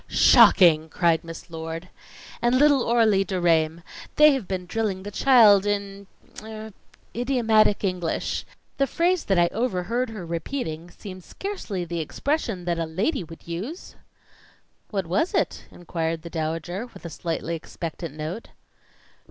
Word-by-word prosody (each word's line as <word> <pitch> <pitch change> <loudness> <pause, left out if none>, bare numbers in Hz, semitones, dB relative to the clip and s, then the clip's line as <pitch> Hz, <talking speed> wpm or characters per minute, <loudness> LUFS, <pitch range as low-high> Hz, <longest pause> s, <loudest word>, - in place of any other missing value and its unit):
"Shocking!" 175 -9 +6
cried 170 -2 +2
Miss 165 +1 -10
Lord. 165 +1 -6 0.5
"And 240 +1 +3
little 285 -3 +4
Aurelie 220 -5 +4
Deraismes 170 -3 +1 0.3
they 300 -1 +7
have 255 -9 -3
been 185 -2 -3
drilling 195 -1 -2
the 205 - -6
child 215 -4 +6
in 200 -1 -3 0.3
er 220 0 -9 0.4
idiomatic 230 -4 +2
English. 180 -4 -2 0.3
The 275 - +2
phrase 350 +5 +1
that 195 - +1
I 175 - +5
overheard 230 +2 -1
her 210 -5 -7
repeating, 170 - -4
seemed 185 -1 -10
scarcely 225 - -5
the 170 0 -4
expression 225 - -2
that 170 -1 -1
a 165 - 0
lady 195 - -1
would 165 0 -13
use." 205 - -6 1.0
"What 195 -4 -2
was 190 - 0
it?" - - -1
inquired 165 -2 -4
the 170 - -8
Dowager, 165 +6 -3
with - - -12
a - - -4
slightly 165 0 -3
expectant 165 -1 -7
note. 155 +8 -5
190 Hz, 140 wpm, -24 LUFS, 170-230 Hz, 1.0 s, they